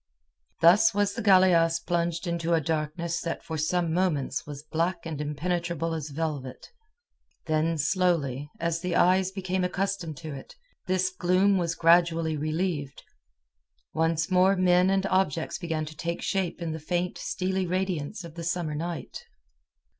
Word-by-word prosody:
Thus 200 Hz, +6 st, +6 dB
was 205 Hz, 0 st, +1 dB
the 235 Hz, -, -4 dB
galeasse 175 Hz, -4 st, +4 dB
plunged 170 Hz, 0 st, -1 dB
into 170 Hz, -1 st, 0 dB
a -, -, +3 dB
darkness 160 Hz, +2 st, -2 dB
that 165 Hz, -, -4 dB
for 160 Hz, -, -5 dB
some 160 Hz, +2 st, 0 dB
moments 155 Hz, -7 st, 0 dB
was 145 Hz, -1 st, -8 dB
black 170 Hz, +3 st, -2 dB
and 155 Hz, -3 st, -4 dB
impenetrable 165 Hz, +2 st, -2 dB
as 155 Hz, -2 st, -4 dB
velvet. 145 Hz, -4 st, -4 dB, 0.8 s
Then 160 Hz, +1 st, +1 dB
slowly, 150 Hz, -4 st, 0 dB
as 170 Hz, 0 st, -1 dB
the 180 Hz, -1 st, -2 dB
eyes 185 Hz, +1 st, +4 dB
became 185 Hz, -1 st, -2 dB
accustomed 180 Hz, -4 st, -2 dB
to 155 Hz, +2 st, -7 dB
it, 135 Hz, -, -10 dB, 0.3 s
this 185 Hz, 0 st, +1 dB
gloom 185 Hz, +2 st, +2 dB
was 170 Hz, -1 st, -1 dB
gradually 165 Hz, -1 st, +3 dB
relieved. 155 Hz, -2 st, -2 dB, 0.9 s
Once 160 Hz, +1 st, 0 dB
more 185 Hz, +2 st, +4 dB
men 180 Hz, 0 st, +4 dB
and 195 Hz, 0 st, +1 dB
objects 185 Hz, -5 st, 0 dB
began 160 Hz, -3 st, -2 dB
to 155 Hz, +1 st, -10 dB
take 170 Hz, +2 st, -4 dB
shape 185 Hz, -2 st, -1 dB
in 165 Hz, -, -2 dB
the 160 Hz, -, -5 dB
faint, 175 Hz, +3 st, -2 dB
steely 190 Hz, -1 st, -2 dB
radiance 185 Hz, 0 st, -2 dB
of 170 Hz, -2 st, -10 dB
the 170 Hz, 0 st, -7 dB
summer 170 Hz, -2 st, -2 dB
night. 165 Hz, +2 st, -5 dB
170 Hz, 150 wpm, -27 LUFS, 160-185 Hz, 0.9 s, Thus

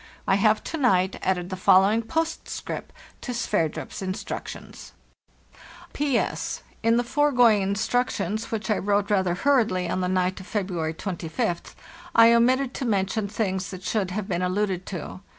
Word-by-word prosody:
I -, -, +4 dB
have 215 Hz, +2 st, +3 dB
to 325 Hz, -, -4 dB
night 190 Hz, -8 st, +2 dB
added 185 Hz, -1 st, -1 dB
the -, -, -2 dB
following 195 Hz, +4 st, +4 dB
postscript 320 Hz, +9 st, -4 dB, 0.3 s
to 250 Hz, -, -4 dB
Sverdrup's 200 Hz, -10 st, -2 dB
instructions: 185 Hz, 0 st, -6 dB, 1.0 s
"«P.S—In 235 Hz, -4 st, -1 dB
the 240 Hz, -, +2 dB
foregoing 245 Hz, -5 st, +4 dB
instructions, 215 Hz, 0 st, -1 dB
which 220 Hz, 0 st, -2 dB
I 210 Hz, -, +2 dB
wrote 205 Hz, +1 st, 0 dB
rather 190 Hz, -3 st, +2 dB
hurriedly 215 Hz, -7 st, +2 dB
on 185 Hz, -, -1 dB
the 180 Hz, -, 0 dB
night 185 Hz, 0 st, 0 dB
of 185 Hz, -, -11 dB
February 180 Hz, -7 st, -2 dB
25th, 175 Hz, +2 st, -3 dB, 0.4 s
I 230 Hz, 0 st, +8 dB
omitted 255 Hz, +3 st, +3 dB
to 265 Hz, -, -4 dB
mention 200 Hz, -1 st, 0 dB
things 190 Hz, -4 st, -2 dB
that 185 Hz, -1 st, -8 dB
should 195 Hz, -1 st, -1 dB
have 195 Hz, +1 st, -4 dB
been 180 Hz, -3 st, -1 dB
alluded 185 Hz, 0 st, -1 dB
to. 180 Hz, 0 st, -6 dB
200 Hz, 145 wpm, -25 LUFS, 185-230 Hz, 1.0 s, I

